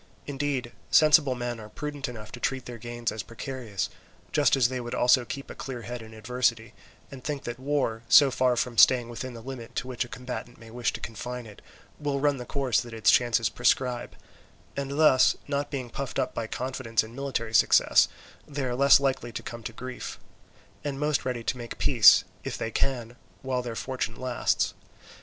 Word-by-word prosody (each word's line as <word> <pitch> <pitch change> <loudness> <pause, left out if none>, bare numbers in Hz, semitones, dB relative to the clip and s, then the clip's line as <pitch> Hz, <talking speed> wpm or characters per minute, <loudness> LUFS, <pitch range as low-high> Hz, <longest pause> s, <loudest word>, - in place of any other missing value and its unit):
Indeed 135 -3 -2 0.2
sensible 155 -4 +5
men 120 -1 -4
are 105 -1 -10
prudent 145 +3 -5
enough 110 -3 -9
to 120 - -8
treat 130 +1 -2
their 120 -1 -8
gains 120 0 -3
as 110 - -4
precarious, 115 -4 -5 0.4
just 145 -2 +4
as 130 -4 +4
they 130 0 -4
would 120 0 -5
also 125 0 +4
keep 140 +3 -6
a - - -6
clear 130 -3 -6
head 120 +2 -6
in 110 0 -11
adversity, 115 0 -1 0.4
and 130 -2 -10
think 145 -2 -3
that 120 +1 -5
war, 135 -5 -1
so 135 +6 +8
far 130 -1 +2
from 120 -1 -1
staying 125 -2 +6
within 120 +1 -6
the 115 - -10
limit 125 -3 -8
to 125 - -2
which 125 -2 -2
a - - -10
combatant 125 0 -7
may 115 -1 -13
wish 120 -1 -1
to - - -5
confine 120 +2 -6
it, 105 -2 -13 0.4
will 145 -2 -1
run 145 0 +2
the 125 - -7
course 135 -5 +1
that 120 -1 -9
its 110 - +4
chances 115 -2 +3
prescribe; 125 +1 0 0.6
and 140 0 -3
thus, 150 -5 +5
not 145 0 -1
being 130 -5 -5
puffed 135 0 -5
up 130 - 0
by 115 - -3
confidence 125 -2 -1
in 110 +1 -11
military 130 -4 -3
success, - - +5 0.4
they 145 -1 -4
are 125 - -1
less 140 +3 +6
likely 135 -3 -1
to - - -6
come 120 -1 -7
to 115 - -6
grief, 125 +2 -7 0.7
and 140 -2 -3
most 150 -1 0
ready 125 -2 -2
to 125 - -2
make 120 -1 -7
peace, - - +7 0.2
if - - -4
they 115 - -3
can, 120 -3 -2 0.3
while 130 -1 -1
their 120 -2 -5
fortune 130 -2 -3
lasts. 130 -1 0
125 Hz, 195 wpm, -27 LUFS, 115-135 Hz, 0.7 s, so